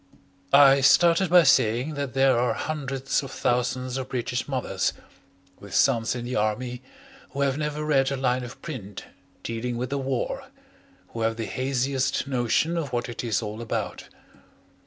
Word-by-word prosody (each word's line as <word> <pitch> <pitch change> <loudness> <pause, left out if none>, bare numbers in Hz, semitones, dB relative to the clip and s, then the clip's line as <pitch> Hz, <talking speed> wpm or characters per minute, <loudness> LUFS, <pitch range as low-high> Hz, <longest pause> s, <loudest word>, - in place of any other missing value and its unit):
I 140 -1 +7
started 170 +6 +5
by 175 0 +7
saying 130 0 +3
that 140 -4 -4
there 135 -1 +4
are 125 0 +1
hundreds 135 -3 -2
of 135 - -7
thousands 125 +1 -1
of 130 - -5
British 125 0 -2
mothers, 120 -9 -1 0.7
with - - -8
sons 115 +2 +2
in 120 -1 -5
the 125 - -4
Army, 120 +4 -1 0.5
who 140 - -3
have 135 -1 +2
never 150 0 -3
read 135 -3 +2
a 140 - -1
line 130 -1 0
of 120 - -9
print 105 - -7 0.4
dealing 115 +1 -3
with 125 +2 -4
the 140 - -1
war, 130 -2 -2 0.6
who 115 - -6
have 115 0 +1
the 115 - -3
haziest 130 +1 -1
notion 135 +6 0
of 150 -5 -3
what 120 0 -2
it 120 - -5
is 115 -1 0
all 105 +1 -5
about. 115 - -4
130 Hz, 165 wpm, -25 LUFS, 120-140 Hz, 0.7 s, I